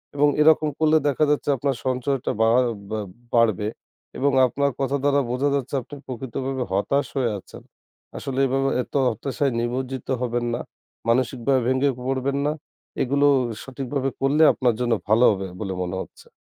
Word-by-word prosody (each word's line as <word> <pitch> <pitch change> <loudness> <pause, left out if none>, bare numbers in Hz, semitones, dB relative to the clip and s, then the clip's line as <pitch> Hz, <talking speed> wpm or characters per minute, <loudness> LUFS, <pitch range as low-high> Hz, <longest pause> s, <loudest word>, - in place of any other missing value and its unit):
এবং 145 +1 +4
এরকম 155 0 +5
করলে 155 0 +4
দেখা 145 +1 +2
যাচ্ছে 145 0 0
আপনার 135 +1 0
সঞ্চয়টা 130 +1 -1
বা 115 - +5 0.4
বা 110 - -2 0.3
বাড়বে 110 -4 +3 0.5
এবং 140 +1 +2 0.2
আপনার 140 +3 0
কথা 135 +1 0
দ্বারা 140 0 +3
বোঝা 130 +3 +1
যাচ্ছে 140 0 -2
আপনি 145 - -11
প্রকৃতভাবে 130 +1 -4
হতাশ 140 +9 +1
হয়ে 125 -4 +1
আছেন। - - -13 0.6
আসলে 135 -1 -4
এভাবে 135 +1 +1
এত - - -21 0.2
হতাশায় 135 +5 -1
নিমজ্জিত 125 +2 -3
হবেন 120 -1 -1
না, - - -4 0.5
মানসিকভাবে 130 +2 +2
ভেঙে 130 +2 +2 0.2
পড়বেন 135 +1 -1
না। 150 - +2 0.5
এগুলো 140 +2 +3 0.4
সঠিকভাবে 135 0 -3
করলে 145 +4 +3
আপনার 125 -3 +1
জন্য 120 -1 +2 0.2
ভালো 110 +3 +5
হবে 95 -2 -3
বলে 95 -3 -3
মনে 90 +1 -4
হচ্ছে। - - -12
130 Hz, 155 wpm, -23 LUFS, 120-140 Hz, 0.6 s, এরকম